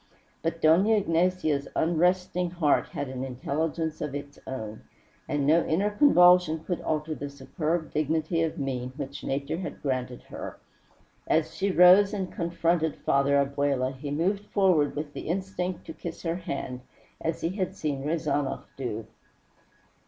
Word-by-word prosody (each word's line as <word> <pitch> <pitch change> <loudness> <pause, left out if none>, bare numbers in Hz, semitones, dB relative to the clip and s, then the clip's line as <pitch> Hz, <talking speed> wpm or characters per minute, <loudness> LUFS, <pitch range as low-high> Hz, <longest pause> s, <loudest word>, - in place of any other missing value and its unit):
But 165 +1 -3
Dona 180 +8 +5
Ignacia's 170 -6 +1
unresting 180 +2 +1
heart 170 -4 +2
had 140 - -4
an 130 0 -5
intelligence 155 +5 -2
of 150 -2 -3
its 140 0 -7
own, 110 -5 -6 0.5
and 145 -1 0
no 160 +4 +5
inner 195 +6 +1
convulsion 180 - +5
could 175 0 -3
alter 155 0 -1
the 145 -1 -5
superb 155 +4 -3
dignity 160 +2 0
of 165 +1 -1
mien 130 -3 -3
which 140 -1 -6
Nature 140 +4 -2
had 185 - -6
granted 130 -3 -2
her. - - -7 0.7
As - - +1
she 195 +1 0
rose 185 +3 +7
and 190 -2 -3
confronted 170 -2 0
Father 140 +1 +2
Abella 140 -2 +1
he 140 +2 -7
moved 190 +8 0
forward 175 -8 +3
with 145 0 -4
the - - -7
instinct 185 0 -3
to 160 - -7
kiss 165 +1 -7
her 165 0 -1
hand, 135 -7 -5 0.4
as 165 0 -2
he 165 - 0
had 185 -1 -3
seen 140 -3 -2
Rezanov 145 -3 -1
do. 115 -5 -4
160 Hz, 150 wpm, -27 LUFS, 140-180 Hz, 0.7 s, rose